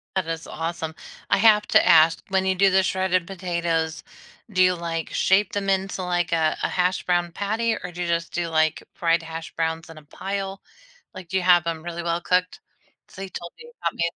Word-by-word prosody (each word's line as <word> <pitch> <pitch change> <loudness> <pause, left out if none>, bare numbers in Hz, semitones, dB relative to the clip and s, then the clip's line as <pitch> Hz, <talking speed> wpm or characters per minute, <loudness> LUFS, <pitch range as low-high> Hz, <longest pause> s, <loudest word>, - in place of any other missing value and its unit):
That 190 -3 0
is 165 0 -4
awesome. 165 -1 -4 0.4
I - - +4
have 210 0 +5
to - - +5
ask. 165 -1 +6
When 190 -1 +1
you 190 - +2
do 195 +1 +4
the 190 0 +3
shredded 185 -1 0
potatoes, 170 -4 -2 0.5
do 185 -2 +2
you, 180 0 +4
like, 165 -1 -4
shape 195 +2 +2
them 200 -1 -1
into, 190 0 -1
like, 175 -1 -1
a 160 -1 +1
a - - +3
hash 180 0 0
brown 175 -1 0
patty, 220 +5 -1
or 180 - -6
do 175 +1 -7
you 175 - -1
just 170 0 -1
do, 175 -1 -1
like, 160 -1 +1
fried 165 0 +1
hash 165 0 -7
browns 160 +1 -2
in 165 - -11
a 155 - -12
pile? 195 +5 -5 0.5
Like, 185 -4 -10
do 190 - 0
you 185 - -1
have 175 -1 +5
them 165 -2 -3
really 170 0 -5
well 170 0 0
cooked? 180 +1 0 0.5
So 190 - -11
you 195 - -6
told 170 -1 -8 0.3
about - - -1
making 170 0 -1
175 Hz, 210 wpm, -24 LUFS, 165-190 Hz, 0.5 s, ask